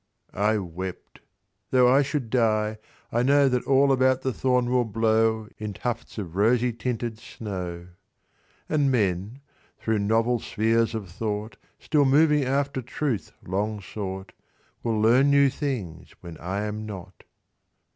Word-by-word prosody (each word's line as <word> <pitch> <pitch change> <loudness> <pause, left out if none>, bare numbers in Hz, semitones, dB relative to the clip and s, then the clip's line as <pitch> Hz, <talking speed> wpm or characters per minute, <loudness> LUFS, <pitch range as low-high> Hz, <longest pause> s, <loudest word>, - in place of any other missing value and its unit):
I 105 +3 +2
wept, 95 -1 -7 0.5
"Tho' 125 -1 +5
I 135 +3 +5
should 140 -5 -2
die, 110 -3 +1 0.3
I 120 - +1
know 140 +2 +4
That 125 -2 0
all 135 +1 +4
about 130 -1 +3
the 130 - 0
thorn 125 -1 +1
will 125 -1 +3
blow 110 0 +1
In 105 -1 -4
tufts 120 +2 -4
of 90 -5 -6
rosy 120 +4 +3
tinted 115 -1 -3
snow; 90 -7 -6 0.8
"And 145 -3 +2
men, 105 +2 -1 0.4
thro' 110 -1 0
novel 115 +4 +2
spheres 115 +2 +1
of 105 -3 -4
thought 105 +4 -4 0.2
Still 145 -2 +2
moving 150 +2 +4
after 135 +1 0
truth 125 -2 -3
long 105 +3 -2
sought, 95 -1 -6 0.5
Will 115 -2 0
learn 120 +6 +5
new 140 -1 +5
things 115 - -5
when 85 -2 -9
I 95 +4 -3
am 105 +1 -4
not." 95 -4 -9
115 Hz, 140 wpm, -25 LUFS, 105-130 Hz, 0.8 s, Tho